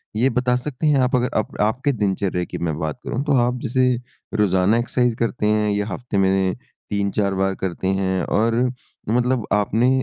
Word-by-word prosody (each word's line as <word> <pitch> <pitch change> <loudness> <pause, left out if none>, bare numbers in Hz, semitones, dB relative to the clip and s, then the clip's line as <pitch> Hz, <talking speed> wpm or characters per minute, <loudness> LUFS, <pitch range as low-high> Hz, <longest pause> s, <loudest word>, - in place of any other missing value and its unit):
ये 125 +5 +3
बता 125 -1 +1
सकते 140 +3 -2
हैं 150 - +4
आप 125 +1 +2
अगर 125 0 +1
आप 110 - -2
आपके 125 +7 +1
दिनचर्या 95 -5 -1
की - - -6
मैं 80 -3 -2
बात 80 -3 -3
करूँ 130 +4 -2
तो 145 - +2
आप 125 0 -1
जैसे 130 0 +2 0.5
रोज़ाना 100 +1 +3
एक्सरसाइज़ 120 0 +1
करते 115 -2 -1
हैं 105 0 +2
या 105 +1 -1
हफ़्ते 105 +1 -4
में 95 -1 +2 0.3
3-4 100 -1 0
बार 95 0 0
करते 95 0 -3
हैं 95 -1 0
और 115 +2 +1 0.5
मतलब 125 0 +1
आपने 110 +4 +2
110 Hz, 180 wpm, -21 LUFS, 95-125 Hz, 0.5 s, हैं